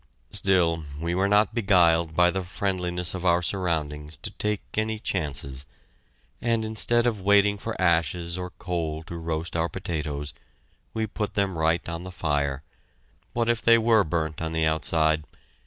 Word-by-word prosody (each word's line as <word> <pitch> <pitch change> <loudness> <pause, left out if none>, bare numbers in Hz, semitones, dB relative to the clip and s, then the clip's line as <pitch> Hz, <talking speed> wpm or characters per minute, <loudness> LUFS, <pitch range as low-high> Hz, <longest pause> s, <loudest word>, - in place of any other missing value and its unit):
Still, 85 -4 +2 0.2
we 85 +2 -2
were 95 +2 +2
not 105 0 +3
beguiled 85 -7 +3
by 90 +1 +5
the 95 - -2
friendliness 90 -2 -2
of 95 -1 -5
our 85 -1 +3
surroundings 80 -5 -2
to - - -3
take 105 -1 -2
any 110 0 0
chances, 70 -9 -2 0.7
and, 115 -2 +1
instead 120 +2 +3
of 110 -5 0
waiting 100 +1 +4
for 115 +1 -5
ashes 85 -1 +1
or 90 0 -4
coal 80 -4 -4
to 85 - -8
roast 80 0 -4
our 85 0 +1
potatoes, 75 -3 -4 0.6
we 110 0 0
put 105 -1 -4
them 100 -3 0
right 80 +1 +1
on 85 +1 -5
the 90 - -7
fire. 70 -5 -1 0.7
What 115 -1 0
if 120 -1 +1
they 115 0 +6
were 115 -2 +4
burnt 80 -1 -2
on 80 0 -3
the 80 -1 +1
outside? 80 0 +1
85 Hz, 160 wpm, -26 LUFS, 80-100 Hz, 0.7 s, they